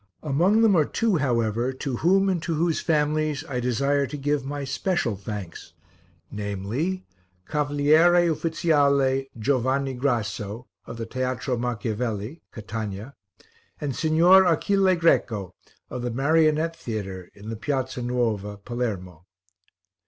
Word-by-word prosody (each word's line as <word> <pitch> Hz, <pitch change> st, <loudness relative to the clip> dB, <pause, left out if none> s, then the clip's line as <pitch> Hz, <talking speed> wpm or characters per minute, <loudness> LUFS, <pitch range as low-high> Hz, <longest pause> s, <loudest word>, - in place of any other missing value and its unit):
Among 175 Hz, +10 st, +3 dB
them 215 Hz, -4 st, +5 dB
are 160 Hz, -, +5 dB
two, 215 Hz, +5 st, 0 dB
however, 120 Hz, -3 st, 0 dB
to 130 Hz, -1 st, -4 dB
whom, 195 Hz, +6 st, +3 dB
and 185 Hz, -4 st, 0 dB
to 165 Hz, 0 st, -2 dB
whose 165 Hz, +1 st, +1 dB
families, 155 Hz, -2 st, 0 dB
I 125 Hz, -4 st, -2 dB
desire 140 Hz, +3 st, +1 dB
to 145 Hz, -, -6 dB
give 145 Hz, 0 st, 0 dB
my 140 Hz, +1 st, -4 dB
special 135 Hz, -, -1 dB
thanks, 100 Hz, -3 st, -7 dB, 0.6 s
namely: 105 Hz, -, -3 dB, 0.4 s
Cavaliere 155 Hz, +4 st, +4 dB
Uffiziale 140 Hz, -5 st, +2 dB
Giovanni 130 Hz, +3 st, 0 dB
Grasso, 115 Hz, -3 st, -2 dB, 0.2 s
of -, -, -7 dB
the 115 Hz, -, -4 dB
Teatro 130 Hz, +1 st, -2 dB
Macchiavelli, 115 Hz, +2 st, -3 dB
Catania; 110 Hz, +1 st, -6 dB, 0.7 s
and 140 Hz, -4 st, -3 dB
Signor 170 Hz, +4 st, +5 dB
Achille 190 Hz, +3 st, +3 dB
Greco, 110 Hz, -, +1 dB, 0.4 s
of 125 Hz, -, -4 dB
the 120 Hz, -, -2 dB
Marionette 155 Hz, +5 st, +2 dB
Theatre, 95 Hz, -, -6 dB
in 105 Hz, +2 st, -10 dB
the -, -, -3 dB
Piazza 130 Hz, +1 st, -2 dB
Nuova, 115 Hz, -5 st, -1 dB
Palermo. 100 Hz, -7 st, -5 dB
135 Hz, 125 wpm, -25 LUFS, 115-155 Hz, 0.7 s, them